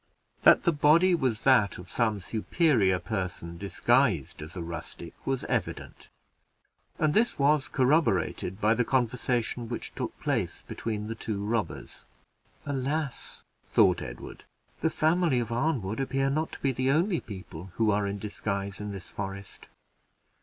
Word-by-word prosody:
That -, -, +7 dB
the 170 Hz, -, +4 dB
body 165 Hz, +5 st, +4 dB
was 130 Hz, -10 st, 0 dB
that 115 Hz, -8 st, +4 dB
of 90 Hz, -, -10 dB
some 110 Hz, -4 st, 0 dB
superior 110 Hz, -, +2 dB
person 90 Hz, -5 st, -4 dB
disguised 100 Hz, -, +1 dB
as 80 Hz, +4 st, -9 dB
a -, -, -3 dB
rustic, 85 Hz, -1 st, -7 dB
was 135 Hz, -1 st, 0 dB
evident, -, -, -4 dB, 0.9 s
and 155 Hz, -1 st, +2 dB
this 230 Hz, +6 st, +2 dB
was 145 Hz, 0 st, +3 dB
corroborated 125 Hz, -, +1 dB
by 110 Hz, +1 st, +4 dB
the 125 Hz, +2 st, +1 dB
conversation 120 Hz, -1 st, 0 dB
which 120 Hz, -, -5 dB
took -, -, -5 dB
place -, -, -1 dB
between 105 Hz, -2 st, -4 dB
the 110 Hz, -, -4 dB
two 105 Hz, -3 st, -4 dB
robbers. 110 Hz, 0 st, -3 dB, 0.6 s
"Alas!" 140 Hz, 0 st, -3 dB, 0.2 s
thought -, -, +4 dB
Edward, -, -, -8 dB, 0.4 s
"the 160 Hz, -, +2 dB
family 160 Hz, -4 st, +2 dB
of 115 Hz, -1 st, -3 dB
Arnwood 115 Hz, -5 st, -1 dB
appear 135 Hz, 0 st, 0 dB
not 155 Hz, +3 st, -1 dB
to -, -, -7 dB
be 135 Hz, -, +2 dB
the 130 Hz, +1 st, 0 dB
only 170 Hz, +5 st, +2 dB
people 95 Hz, -3 st, -9 dB
who 110 Hz, -2 st, +2 dB
are 100 Hz, 0 st, +1 dB
in 100 Hz, +1 st, -3 dB
disguise 100 Hz, -1 st, -4 dB
in 105 Hz, 0 st, -4 dB
this 95 Hz, -3 st, -8 dB
forest. 100 Hz, 0 st, -7 dB
115 Hz, 145 wpm, -28 LUFS, 100-140 Hz, 0.9 s, That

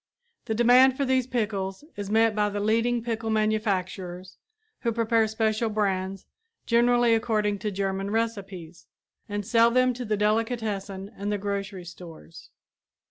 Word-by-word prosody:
The 220 Hz, -, -2 dB
demand 250 Hz, +3 st, +5 dB
for 280 Hz, -, 0 dB
these 260 Hz, -1 st, +1 dB
pickles 205 Hz, -4 st, -2 dB
is 200 Hz, -1 st, -5 dB
met 225 Hz, 0 st, +3 dB
by 210 Hz, -1 st, +1 dB
the 205 Hz, 0 st, -3 dB
leading 230 Hz, +3 st, +1 dB
pickle 225 Hz, -1 st, -3 dB
manufacturers 190 Hz, -4 st, -2 dB, 0.4 s
who 235 Hz, -, -1 dB
prepare 225 Hz, 0 st, +2 dB
special 220 Hz, +1 st, 0 dB
brands, 195 Hz, -2 st, -2 dB, 0.4 s
generally 240 Hz, 0 st, +3 dB
according 215 Hz, -2 st, 0 dB
to 210 Hz, +1 st, -2 dB
German 195 Hz, 0 st, -2 dB
recipes, 195 Hz, -7 st, -4 dB, 0.4 s
and 205 Hz, 0 st, -3 dB
sell 230 Hz, +2 st, +4 dB
them 255 Hz, +1 st, +3 dB
to 250 Hz, +1 st, -6 dB
the 215 Hz, -2 st, -1 dB
delicatessen 210 Hz, -2 st, -1 dB
and 205 Hz, +1 st, -3 dB
the 205 Hz, -, 0 dB
grocery 200 Hz, -2 st, -4 dB
stores. 165 Hz, -, -12 dB
215 Hz, 140 wpm, -26 LUFS, 195-230 Hz, 0.4 s, demand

